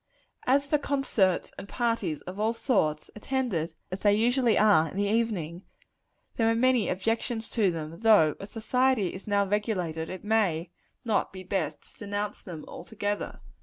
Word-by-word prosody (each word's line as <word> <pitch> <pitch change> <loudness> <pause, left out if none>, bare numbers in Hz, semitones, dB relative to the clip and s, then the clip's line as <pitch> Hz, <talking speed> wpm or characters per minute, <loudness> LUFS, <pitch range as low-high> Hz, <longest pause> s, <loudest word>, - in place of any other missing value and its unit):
As 275 +2 +4
for 295 +1 +1
concerts, 270 -11 +1
and 200 - -9
parties 230 - -1
of 185 +3 -8
all 220 +2 +1
sorts, 155 - 0
attended 210 -8 -2 0.2
as 185 - -3
they 205 0 +4
usually 240 +1 +3
are 200 -7 +5
in 185 - -8
the 205 - +1
evening, 200 -7 -1 0.8
there 225 -1 +3
are 225 - +2
many 250 -2 +3
objections 225 +4 -2
to 215 -5 +2
them 165 -1 -5
though, 210 -9 +5
as 195 - -8
society 245 -2 +1
is 190 - -10
now 200 -1 +2
regulated, 185 -6 -1
it 185 - -7
may 190 -6 +1 0.3
not 220 -3 +1
be 185 -1 -9
best 175 -5 -2
to - - -17
denounce 205 0 -3
them 165 -5 -8
altogether. 205 -1 -4
205 Hz, 165 wpm, -28 LUFS, 180-230 Hz, 0.8 s, are